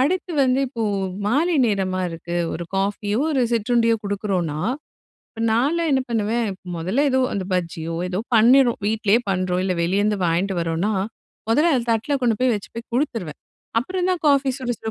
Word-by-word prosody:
அடுத்து 355 +6 0
வந்து 255 +1 +2
இப்போ, 235 -3 -4 0.4
மாலை 310 +10 +2
நேரமா 190 -4 0
இருக்கு. 170 +1 -5 0.2
ஒரு 170 - -4
காஃபியோ, 205 +2 -1
ஒரு 280 -4 +1
சிற்றுண்டியோ, 230 0 +2
கொடுக்குறோம்னா. 195 -6 -2 0.7
இப்ப 225 - -10
நான்லாம் 295 +9 +1
என்ன 265 - +3
பண்ணுவேன், 225 0 0 0.3
மொதல்ல 190 - 0
ஏதோ 260 0 +2
அந்த 195 -2 -2
பஜ்ஜியோ 165 -2 -2
ஏதோ 180 0 -2 0.2
பண்ணிறோம். 240 +2 +5
வீட்லேயே 215 +1 +2
பண்ணுறோம், 185 -1 0
இல்ல 185 -1 0
வெளியருந்து 205 +4 +1
வாங்கிட்டு 175 +3 0
வரோம்னா, 165 +5 -1 0.6
மொதல்ல 305 +9 +4
அத 235 - -2
தட்ல 230 +6 0
கொண்டு 235 -3 +2
போய் 255 -1 +3
வச்சு 205 - -6
போய் 230 +1 -7
கொடுத்துருவேன். 230 - -2 0.4
அப்புறந்தான் 365 +5 -1
காஃபி 280 -1 +4
சுட 255 -2 -3
சுட 220 - -4
220 Hz, 155 wpm, -22 LUFS, 185-255 Hz, 0.7 s, பண்ணிறோம்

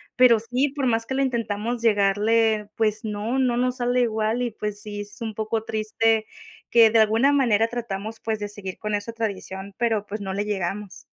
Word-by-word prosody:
pero 245 -3 +6
sí, 250 +5 0
por 275 -1 -3
más 225 -1 +1
que 265 - -3
lo 270 - +1
intentamos 235 -2 -1
llegarle, 215 +1 +3
pues, 215 0 0
no, 215 +4 -2
no 250 -2 +2
nos 250 +1 0
sale 245 0 +1
igual 220 +1 0
y, 245 - 0
pues, 210 -1 -5
sí, 205 -1 -6
es 205 +4 -10
un 220 -2 -4
poco 220 0 -2
triste 220 0 +1 0.5
que 230 -1 +7
de 225 - +3
alguna 225 +6 +4
manera 230 -6 +3
tratamos, 225 -2 -5
pues, 220 -1 -2
de 205 - -3
seguir 195 -2 -7
con 210 -1 -2
esa 205 +3 -4
tradición, 200 -3 -5
pero, 225 -3 0
pues, 210 +2 -5
no 190 -1 -4
le 205 +2 -2
llegamos. 195 -1 -4
220 Hz, 200 wpm, -24 LUFS, 210-235 Hz, 0.5 s, que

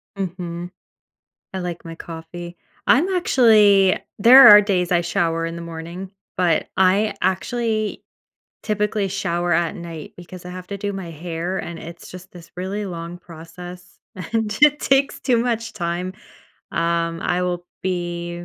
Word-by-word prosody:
Mhm. 175 -2 -5 0.8
I 190 - -4
like 175 -2 -5
my 165 - -8
coffee. 170 +1 -9 0.3
I'm 315 +9 +4
actually 210 - +5 0.2
there 255 +6 +10
are 210 0 +11
days 185 -4 0
I 175 - +4
shower 165 -1 0
in 165 0 -5
the 170 - -7
morning, 170 +3 -7 0.3
but 175 -3 +1
I 195 +2 +3
actually 215 +3 -1 0.6
typically 210 -1 -1
shower 175 -2 -1
at 170 +3 +1
night 170 -4 -8
because 180 0 -11
I 180 - -7
have 180 0 -8
to 200 - -4
do 200 0 -3
my 190 -3 -6
hair, 170 +3 -4
and 170 -1 -6
it's 170 +1 -10
just 185 0 -11
this 170 -2 -13
really 195 +3 -3
long 170 0 -7
process, 175 +2 -12 0.2
and 215 +3 -2
it 295 0 +6
takes 275 +1 +2
too 245 -3 +2
much 230 -1 -1
time, 180 -1 -3 0.6
um, 170 0 0
I 180 0 0
will 175 -1 -3 0.2
be 175 -1 -3
180 Hz, 150 wpm, -21 LUFS, 170-205 Hz, 0.8 s, are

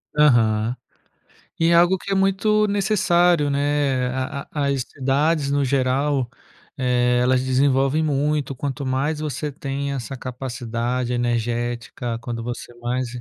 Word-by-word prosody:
Aham. 115 -5 +3 0.8
E 165 - +3
é 170 - +4
algo 175 +2 +5
que 195 - -7
é 195 - +2
muito 205 +2 +2
necessário, 180 -6 +2
né, 140 -2 +1
a 135 +2 -4
a 145 -2 -1
as 140 -2 0
cidades, 140 +3 0
no 145 0 +2
geral, 135 0 +1 0.5
eh, 125 -1 +2
elas 125 +1 +2
desenvolvem 135 +3 +2
muito, 145 -1 0
quanto 140 +1 -4
mais 135 +4 -1
você 150 0 -3
tem 140 +1 -4
essa 135 0 -5
capacidade 125 -1 -3
energética, 120 0 -2
quando 120 -1 -5
você 120 0 -6
mais, 125 +1 -2
135 Hz, 130 wpm, -22 LUFS, 125-150 Hz, 0.8 s, algo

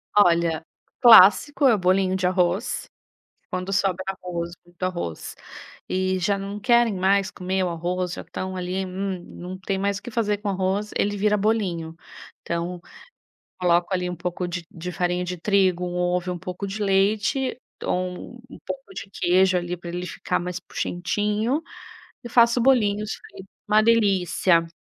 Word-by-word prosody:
Olha, 170 -5 +3 0.4
clássico 240 +5 +7
é 245 - +6
o - - +2
bolinho 185 0 +2
de 185 -1 +1
arroz. 180 +4 0 0.6
Quando 185 +1 -3
sobra 190 -1 +1
arroz, 180 -3 -4 0.2
muito 175 0 -24
arroz, 175 - -4 0.5
e 185 0 0
já 195 +2 0
não 200 +1 -5
querem 235 0 +3
mais 190 +1 +2
comer 185 +1 -2
o 180 - 0
arroz, 175 +1 -2
já - - -6
estão 185 0 -5
ali 185 +1 -2
hum, 190 -1 -4
não 185 +1 -8
tem 195 +1 -2
mais 200 +1 -1
o - - -29
que 245 - -7
fazer 210 -3 0
com 210 - -6
o - - +1
arroz, 195 +2 -1
ele 205 0 0
vira 210 +1 +2
bolinho. 190 -7 -1 0.5
Então, 170 +1 -3 0.8
coloco 175 +1 +2
ali 180 -1 -1
um 180 - -4
pouco 180 +1 -3
de 175 0 -4
de 180 +2 -6
farinha 180 0 -1
de 180 0 -4
trigo, 185 -1 +2
um 175 - -4
ovo 180 0 0
e - - -1
um 175 - -7
pouco 180 +3 -5
de 200 +2 -5
leite, 205 +6 +1 0.3
ou 180 +4 -3
um 245 - -13
um - - -11
pouco 275 +8 -7
de 200 - -7
queijo, 185 0 +3
ali, 175 0 -3
pra 175 0 -9
ele 180 +1 -4
ficar - - -2
mais 180 +1 -4
puxentinho, 210 - -1 0.6
e 240 - -7
faço 235 +1 +4
bolinhos. 215 -5 +2
Fica - - -12 0.3
uma 215 +1 +5
delícia. 190 -6 +3
185 Hz, 170 wpm, -24 LUFS, 180-205 Hz, 0.8 s, clássico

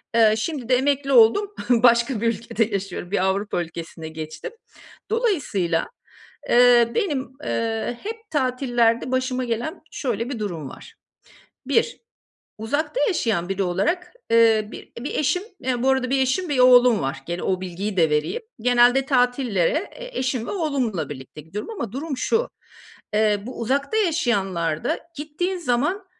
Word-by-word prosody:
Eee, 220 -2 +6
şimdi 260 0 -4
de 255 - +5
emekli 275 +1 +1
oldum, 270 - +5 0.2
başka 235 -1 +4
bir 230 - +1
ülkede 230 0 0
yaşıyorum. 195 -3 -5
Bir 200 -2 +1
Avrupa 195 -1 0
ülkesine 165 -1 -8
geçtim. 155 - -7 0.6
Dolayısıyla, 290 - 0 0.6
eee, 240 -1 +6
benim, 285 - -1
eee, 230 +1 -2
hep 445 +1 -7
tatillerde 250 -4 +1
başıma 255 0 0
gelen 240 +6 -3
şöyle 240 -7 -2
bir 255 - -4
durum 170 -9 -4
var. - - -13 0.7
1 475 - +1 0.6
uzakta 290 - -2
yaşayan 220 - 0
biri 195 0 -1
olarak, 335 - -1 0.2
eee, 225 -2 +4
bi - - -11
bir 270 - -5
eşim, 300 +5 +1 0.4
bu 255 +3 0
arada 265 -1 +1
1 270 - +2
eşim, 300 +8 0
1 285 -3 -1
oğlum 250 -2 +6
var. 135 0 -3
Gene 175 +1 -4
o 185 -1 0
bilgiyi 190 +3 -4
de 165 -3 +3
vereyim. 150 - -1 0.2
Genelde 245 +2 +4
tatillere 250 - +1
e - - -8
eşim 255 -3 -1
ve - - -4
oğlumla 260 - -1
birlikte 135 +1 -9
gidiyorum 170 - -7
ama 235 - -5
durum 280 +2 -4
şu: 455 - 0 0.7
Eee, 210 -1 +3
bu 255 - -7
uzakta 275 - 0
yaşayanlarda 195 - 0 0.2
gittiğin 310 +6 -3
zaman 325 +7 0
240 Hz, 145 wpm, -23 LUFS, 200-285 Hz, 0.7 s, Eee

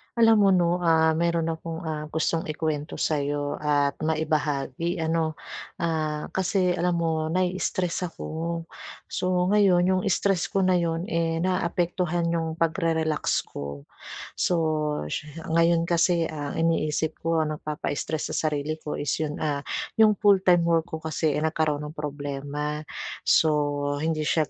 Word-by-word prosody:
Alam 225 -1 +6
mo 200 -1 +5
no, 175 -2 +3
ah, 160 -2 +4
meron 165 0 +1
akong 165 0 -6
ah, 155 -2 -3
gustong 160 +1 -1
ikuwento 155 -1 -2
sa 155 -2 0
'yo 145 0 -2
at 145 -1 +1
maibahagi 155 0 -1
ano. 160 -1 0 0.4
Ah, 155 -3 -2
kasi 185 -1 +1
alam 180 0 +1
mo 160 -2 0
nai-istress 180 +1 -1
ako, 165 0 -4 0.5
so, 180 0 +1
ngayon 195 -4 +5
'yong 185 0 +2
stress 195 -1 +1
ko 195 - 0
na 185 -1 +4
'yon 165 0 -1 0.4
naaapektuhan 175 -1 0
'yong 165 -1 -1
pagre-relax 165 -2 0
ko. 70 0 -7 0.5
So, 180 - +2 1.0
ngayon 170 0 +4
kasi 170 0 +2
ang 145 -2 -5
iniisip 160 -1 0
ko 165 0 +1
ang 155 -1 -2
nagpapa-stress 150 +1 -3
sa 155 - 0
sarili 150 +1 -3
ko 150 - -5
is 145 - -2
'yon, 150 -1 -2
ah, 145 -2 -1 0.4
yong 215 -2 +6
full-time 190 -4 +4
work 165 0 +2
ko 160 - -4
kasi 155 -1 0
nagkaroon 155 -1 0
ng 150 - -7
problema, 145 0 -4 0.4
so, 160 - +4 0.5
hindi 155 -1 -1
siya 155 -1 +1
160 Hz, 135 wpm, -26 LUFS, 150-175 Hz, 1.0 s, Alam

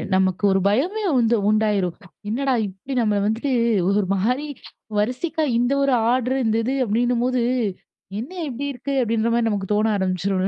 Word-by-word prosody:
நமக்கு 190 +1 +1
ஒரு 195 - +3
பயமே 350 - 0
வந்து 235 0 +3
உண்டாயிரும். 210 -5 +1 0.3
என்னடா 265 +3 0
இப்படி 195 +8 -8
நம்மள 210 -3 +1
வந்துட்டு 225 +6 -1 0.4
ஒரு 200 +1 +2
மாரி 250 +10 0 0.5
வரிசைக்கா 255 +9 -1
இந்த 245 +2 +1
ஒரு 275 -2 +2 0.2
ஆர்ட்ரு 255 +1 +1
இந்த 220 0 +2
இது 260 +4 -1
அப்படின்னும்போது, 245 +3 +1 0.8
என்ன 250 +10 -6 0.2
இப்படி 270 +3 -4
இருக்கு? 275 +3 -4
அப்படின்ற 230 -1 0
மாரி 235 -1 +1
நமக்கு 200 -1 -3
தோண 210 +1 +2
ஆரம்பிச்சுரும்ல. 190 0 0
230 Hz, 150 wpm, -22 LUFS, 205-255 Hz, 0.8 s, ஒரு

